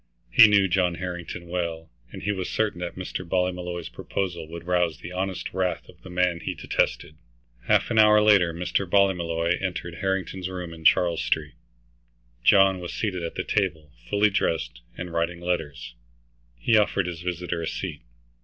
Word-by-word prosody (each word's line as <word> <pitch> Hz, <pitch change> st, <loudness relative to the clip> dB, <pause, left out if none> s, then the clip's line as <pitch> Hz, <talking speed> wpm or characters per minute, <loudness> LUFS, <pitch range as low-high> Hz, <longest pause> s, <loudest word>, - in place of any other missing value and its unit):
He 110 Hz, -, +9 dB
knew 100 Hz, -2 st, +4 dB
John 90 Hz, -1 st, +1 dB
Harrington 85 Hz, -1 st, -6 dB
well, 85 Hz, -2 st, -4 dB, 0.2 s
and -, -, -9 dB
he 105 Hz, -, 0 dB
was 95 Hz, -3 st, -3 dB
certain 110 Hz, -5 st, -1 dB
that 90 Hz, -1 st, -5 dB
Mr. 90 Hz, 0 st, -5 dB
Ballymolloy's 90 Hz, -1 st, -2 dB
proposal 90 Hz, -5 st, -4 dB
would 85 Hz, +1 st, -9 dB
rouse 90 Hz, -2 st, +1 dB
the 85 Hz, -, -9 dB
honest 95 Hz, 0 st, -3 dB
wrath 95 Hz, -1 st, -1 dB
of -, -, -17 dB
the 95 Hz, -, -11 dB
man 90 Hz, -1 st, +1 dB
he -, -, -4 dB
detested. 75 Hz, -, -1 dB, 0.5 s
Half -, -, +3 dB
an 110 Hz, -, +3 dB
hour 105 Hz, 0 st, +7 dB
later 100 Hz, -5 st, +5 dB
Mr. 90 Hz, +2 st, -2 dB
Ballymolloy 85 Hz, -3 st, +2 dB
entered 90 Hz, -2 st, -4 dB
Harrington's 95 Hz, -1 st, -2 dB
room 90 Hz, -2 st, -6 dB
in 80 Hz, -1 st, -12 dB
Charles 85 Hz, 0 st, +4 dB
Street. 75 Hz, -2 st, -1 dB, 0.9 s
John 95 Hz, +1 st, +5 dB
was 90 Hz, -1 st, -6 dB
seated 95 Hz, -5 st, -2 dB
at 85 Hz, -, -5 dB
the -, -, -2 dB
table, 80 Hz, -7 st, -1 dB, 0.2 s
fully 105 Hz, 0 st, +3 dB
dressed, -, -, -1 dB, 0.2 s
and 90 Hz, -1 st, -6 dB
writing 85 Hz, +1 st, -1 dB
letters. 85 Hz, -8 st, -3 dB, 0.6 s
He 85 Hz, -, +2 dB
offered 100 Hz, -3 st, +2 dB
his 85 Hz, -1 st, -5 dB
visitor 90 Hz, -1 st, -3 dB
a 80 Hz, -, -3 dB
seat. -, -, -5 dB
90 Hz, 170 wpm, -25 LUFS, 85-95 Hz, 0.9 s, He